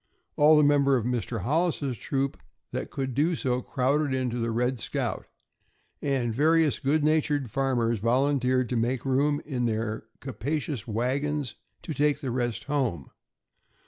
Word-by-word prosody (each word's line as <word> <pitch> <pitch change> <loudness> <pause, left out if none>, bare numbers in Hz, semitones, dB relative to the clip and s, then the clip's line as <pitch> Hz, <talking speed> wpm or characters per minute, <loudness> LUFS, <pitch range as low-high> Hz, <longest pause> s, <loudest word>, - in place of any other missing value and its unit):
All 150 +1 +6
the 150 - +5
members 140 -2 +4
of - - -6
Mr. 120 -3 -2
Hollis's 150 - 0
troop 135 +5 -2 0.4
that - - -4
could 135 -2 -3
do 155 +7 +2
so 125 -4 -1
crowded 135 +2 0
into 125 -2 -1
the 115 0 -1
"Red 125 +2 0
Scout," - - -3 0.7
and 130 -5 0
various 155 +2 +3
good 145 +3 +1
natured 150 -5 +1
farmers 120 -4 +1
volunteered 130 +2 +2
to 125 - -1
make 120 +2 0
room 145 +2 +2
in 125 -5 -1
their 110 0 -2
capacious 140 0 -3
wagons 130 +4 -1 0.3
and 160 - -4
take 145 -1 +2
the 135 -5 -3
rest 120 -3 -2
home. 130 - -2
130 Hz, 145 wpm, -27 LUFS, 120-145 Hz, 0.7 s, All